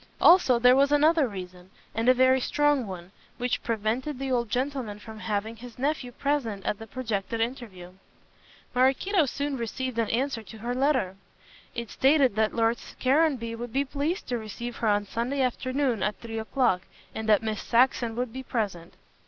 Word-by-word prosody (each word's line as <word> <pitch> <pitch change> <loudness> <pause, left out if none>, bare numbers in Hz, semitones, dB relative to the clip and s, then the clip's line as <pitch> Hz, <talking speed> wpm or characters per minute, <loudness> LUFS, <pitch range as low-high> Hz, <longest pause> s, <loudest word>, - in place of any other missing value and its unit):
Also, 335 -8 +6
there 250 +2 +6
was 280 +1 +4
another 300 0 +4
reason, 180 -3 -9 0.2
and 225 +3 +1
a - - +8
very 260 +1 +4
strong 290 -3 +2
one, 180 -1 -8 0.3
which 245 0 -1
prevented 235 +6 -2
the 270 0 -3
old 240 -3 0
gentleman 250 -3 -2
from 220 +1 -11
having 215 +1 -2
his 240 0 -11
nephew 275 -1 -1
present 245 -8 -2
at 205 - -1
the 225 - -9
projected 225 -1 -3
interview. 225 -7 -4 0.8
Maraquito 275 +7 +3
soon 280 +1 -2
received 235 +1 -3
an 225 - 0
answer 245 0 -1
to 220 +1 -12
her 235 +3 -3
letter. 255 -8 +1 0.6
It 235 -3 -5
stated 270 -5 +3
that 220 0 +1
Lord 230 0 +2 0.2
Caranby 265 -4 +2
would 240 0 -6
be 275 +1 +1
pleased 295 +8 -2
to 245 -2 -1
receive 235 +2 -6
her 225 - -1
on 205 -1 +2
Sunday 245 +6 -1
afternoon 255 -2 0
at 210 - -1
three 225 -1 -5
o'clock, 220 -4 +1 0.3
and 220 0 -4
that 210 0 +5
Miss 220 -1 -2
Saxon 235 -1 +2
would 245 -1 -3
be 260 - -5
present. 200 -9 -3
240 Hz, 175 wpm, -27 LUFS, 220-265 Hz, 0.8 s, a